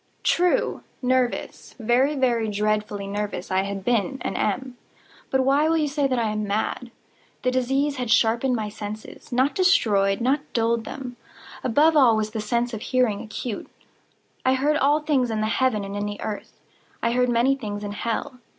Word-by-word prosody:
True!—nervous—very, 255 Hz, -4 st, 0 dB
very 240 Hz, -4 st, +1 dB
dreadfully 210 Hz, -1 st, -1 dB
nervous 200 Hz, -2 st, -4 dB
I 190 Hz, 0 st, +3 dB
had 195 Hz, 0 st, -5 dB
been 245 Hz, +3 st, +1 dB
and -, -, -3 dB
am; 250 Hz, +4 st, -1 dB, 0.5 s
but 265 Hz, -, +2 dB
why 280 Hz, +4 st, +3 dB
will 330 Hz, -, +3 dB
you 305 Hz, -2 st, +1 dB
say 285 Hz, 0 st, 0 dB
that 255 Hz, -2 st, 0 dB
I 225 Hz, -2 st, 0 dB
am 215 Hz, -1 st, -2 dB
mad? 220 Hz, +4 st, -2 dB, 0.5 s
The 255 Hz, -, +2 dB
disease 270 Hz, +3 st, 0 dB
had 250 Hz, -2 st, -3 dB
sharpened 235 Hz, +4 st, +3 dB
my 215 Hz, -2 st, -2 dB
senses—not 220 Hz, +5 st, -3 dB
destroyed—not 255 Hz, -, +2 dB
dulled 230 Hz, -1 st, +1 dB
them. 250 Hz, -3 st, -7 dB, 0.5 s
Above 300 Hz, +6 st, +4 dB
all 250 Hz, -7 st, +6 dB
was 215 Hz, 0 st, -1 dB
the 220 Hz, -1 st, -3 dB
sense 235 Hz, +3 st, -1 dB
of 220 Hz, -, -4 dB
hearing 245 Hz, -6 st, +1 dB
acute. 215 Hz, +1 st, -5 dB, 0.7 s
I 260 Hz, 0 st, +3 dB
heard 295 Hz, +3 st, +2 dB
all 295 Hz, +2 st, +3 dB
things 280 Hz, -5 st, +1 dB
in 220 Hz, -1 st, -1 dB
the -, -, +1 dB
heaven 225 Hz, -1 st, +1 dB
and 195 Hz, 0 st, -6 dB
in 205 Hz, 0 st, -2 dB
the 205 Hz, 0 st, -6 dB
earth. 210 Hz, -1 st, -6 dB, 0.4 s
I 230 Hz, -, +2 dB
heard 250 Hz, +1 st, +2 dB
many 240 Hz, +3 st, +3 dB
things 210 Hz, -5 st, -5 dB
in 205 Hz, -, -4 dB
hell. 230 Hz, +4 st, -3 dB
240 Hz, 170 wpm, -24 LUFS, 215-265 Hz, 0.7 s, all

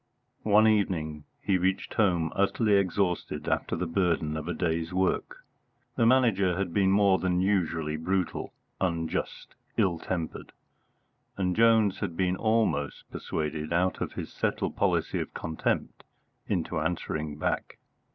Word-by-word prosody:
One 105 Hz, +1 st, +6 dB
evening 80 Hz, -8 st, 0 dB, 0.2 s
he 95 Hz, -2 st, +2 dB
reached 95 Hz, +2 st, -1 dB
home 90 Hz, -6 st, +2 dB
utterly 100 Hz, +2 st, +2 dB
exhausted 95 Hz, -5 st, 0 dB
after -, -, 0 dB
the 90 Hz, -, -2 dB
burden 80 Hz, -3 st, 0 dB
of 80 Hz, -1 st, -4 dB
the 90 Hz, -, -2 dB
day's 85 Hz, -1 st, -1 dB
work. 95 Hz, +1 st, -1 dB, 0.5 s
The 115 Hz, -2 st, +3 dB
Manager 105 Hz, -8 st, +3 dB
had 95 Hz, -3 st, -2 dB
been 95 Hz, -2 st, +3 dB
more 100 Hz, -1 st, +4 dB
than 90 Hz, -1 st, +1 dB
usually 85 Hz, -5 st, 0 dB
brutal, 90 Hz, +2 st, -2 dB, 0.3 s
unjust, 85 Hz, -3 st, -2 dB, 0.2 s
ill 95 Hz, -6 st, +2 dB
tempered, 85 Hz, -3 st, -4 dB, 0.8 s
and 90 Hz, -2 st, 0 dB
Jones 110 Hz, -3 st, +4 dB
had 85 Hz, -, -4 dB
been 90 Hz, -1 st, +1 dB
almost 105 Hz, -10 st, 0 dB
persuaded 75 Hz, 0 st, -3 dB
out 90 Hz, +2 st, +1 dB
of -, -, -3 dB
his -, -, -6 dB
settled -, -, -1 dB
policy -, -, +1 dB
of -, -, -5 dB
contempt 80 Hz, -1 st, -2 dB, 0.4 s
into -, -, -1 dB
answering 75 Hz, -1 st, -2 dB
back. -, -, -2 dB
90 Hz, 135 wpm, -28 LUFS, 80-100 Hz, 0.8 s, One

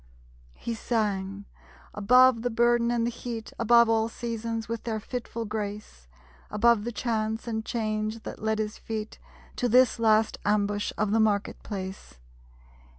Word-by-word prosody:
_ -, -, -27 dB
He 235 Hz, -, -4 dB
sang; 200 Hz, -4 st, -2 dB, 0.5 s
above 250 Hz, +3 st, +5 dB
the 245 Hz, -, 0 dB
burden 235 Hz, 0 st, +3 dB
and 235 Hz, -1 st, +1 dB
the 240 Hz, -, -1 dB
heat, 230 Hz, -2 st, -6 dB
Above 235 Hz, +1 st, +6 dB
all 225 Hz, 0 st, +2 dB
seasons 230 Hz, -1 st, -4 dB
with 230 Hz, -1 st, -4 dB
their 220 Hz, -2 st, -2 dB
fitful 230 Hz, 0 st, -5 dB
grace; 205 Hz, -, -6 dB, 0.4 s
Above 215 Hz, 0 st, +3 dB
the 240 Hz, -, -2 dB
chance 220 Hz, -1 st, -2 dB
and 220 Hz, -1 st, -2 dB
change 215 Hz, -1 st, -2 dB
that -, -, -8 dB
led 220 Hz, 0 st, 0 dB
his 215 Hz, 0 st, -3 dB
feet 220 Hz, -1 st, -5 dB, 0.4 s
To 245 Hz, -, 0 dB
this 250 Hz, +1 st, +4 dB
last 220 Hz, -1 st, +3 dB
ambush 205 Hz, 0 st, 0 dB
of 210 Hz, -1 st, 0 dB
the 225 Hz, -, +3 dB
Market 210 Hz, -2 st, +1 dB
place. 190 Hz, -, -7 dB
220 Hz, 150 wpm, -27 LUFS, 210-235 Hz, 0.5 s, Above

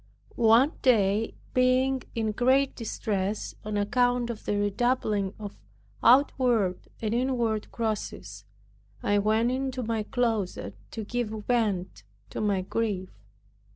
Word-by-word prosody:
One 235 Hz, +5 st, +5 dB
day, 215 Hz, -3 st, +2 dB, 0.2 s
being 255 Hz, +1 st, +3 dB
in 220 Hz, -2 st, 0 dB
great 260 Hz, +5 st, +2 dB
distress 210 Hz, -3 st, -3 dB
on 210 Hz, 0 st, -3 dB
account 245 Hz, +3 st, +1 dB
of 225 Hz, -, -9 dB
the 205 Hz, -, 0 dB
redoubling 205 Hz, -1 st, 0 dB
of 205 Hz, -, -8 dB, 0.4 s
outward 240 Hz, -7 st, +4 dB, 0.2 s
and 215 Hz, 0 st, 0 dB
inward 235 Hz, -4 st, 0 dB
crosses, 205 Hz, -, -4 dB, 0.6 s
I 205 Hz, 0 st, +2 dB
went 220 Hz, +4 st, +2 dB
into 260 Hz, -1 st, -2 dB
my 225 Hz, -1 st, -1 dB
closet 220 Hz, -4 st, -1 dB, 0.2 s
to 220 Hz, -, -5 dB
give 240 Hz, +1 st, -2 dB, 0.2 s
vent 205 Hz, -, 0 dB, 0.3 s
to -, -, -4 dB
my 200 Hz, -3 st, +1 dB
grief. 195 Hz, -1 st, -2 dB
225 Hz, 120 wpm, -27 LUFS, 205-245 Hz, 0.6 s, One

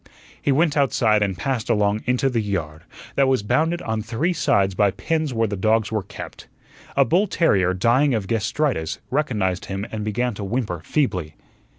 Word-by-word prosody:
He -, -, +1 dB
went 150 Hz, +2 st, +2 dB
outside 115 Hz, -7 st, +2 dB
and 95 Hz, -3 st, 0 dB
passed 120 Hz, +3 st, -2 dB
along 105 Hz, -1 st, +2 dB
into 125 Hz, +2 st, +2 dB
the 120 Hz, -4 st, 0 dB
yard, 80 Hz, -7 st, -4 dB, 0.3 s
that 135 Hz, -1 st, +3 dB
was 130 Hz, -5 st, +2 dB
bounded 165 Hz, +10 st, +1 dB
on 110 Hz, -1 st, -2 dB
three 120 Hz, -, -1 dB
sides 100 Hz, -, +2 dB
by 100 Hz, +2 st, +3 dB
pens 155 Hz, -, -2 dB
where 115 Hz, -2 st, +1 dB
the 100 Hz, -, -3 dB
dogs 110 Hz, +3 st, +1 dB
were 110 Hz, -1 st, 0 dB
kept. -, -, -10 dB, 0.5 s
A 140 Hz, -, +6 dB
bull 185 Hz, -, +2 dB
terrier 95 Hz, -, +2 dB
dying 120 Hz, +8 st, +3 dB
of 105 Hz, -3 st, -2 dB
gastritis 115 Hz, -, -1 dB
recognized 105 Hz, -10 st, 0 dB
him 95 Hz, +1 st, -4 dB
and 110 Hz, -1 st, -4 dB
began 120 Hz, +4 st, -1 dB
to 100 Hz, -, -6 dB
whimper 100 Hz, -5 st, -2 dB
feebly. 90 Hz, -, -1 dB
110 Hz, 180 wpm, -22 LUFS, 100-135 Hz, 0.5 s, A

